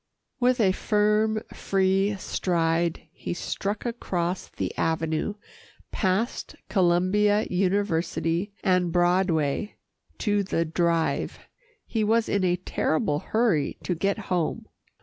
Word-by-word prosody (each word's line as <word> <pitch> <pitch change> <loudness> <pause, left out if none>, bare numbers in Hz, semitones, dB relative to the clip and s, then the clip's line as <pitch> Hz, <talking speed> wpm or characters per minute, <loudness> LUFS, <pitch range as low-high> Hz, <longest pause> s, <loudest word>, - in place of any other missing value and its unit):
With 250 0 +3
a 195 -4 +4
firm, 210 +2 +1
free 195 +1 +1
stride, 170 -3 0
he - - -5
struck 200 +4 -3
across 185 -7 -2
the - - -4
avenue, 160 +4 -1 0.6
past 200 +4 -1
Columbia 195 +3 +3
University 180 -1 0
and 180 -3 +2
Broadway 175 0 +1 0.4
to 205 -2 +1
the 170 -3 0
Drive. 165 0 0 0.5
He 220 -2 -1
was 225 +2 +2
in 200 -2 +1
a 180 -1 +3
terrible 155 -4 0
hurry 210 -11 +1
to 180 - -1
get 195 +5 0
home. 180 -6 -2
185 Hz, 110 wpm, -26 LUFS, 170-210 Hz, 0.6 s, a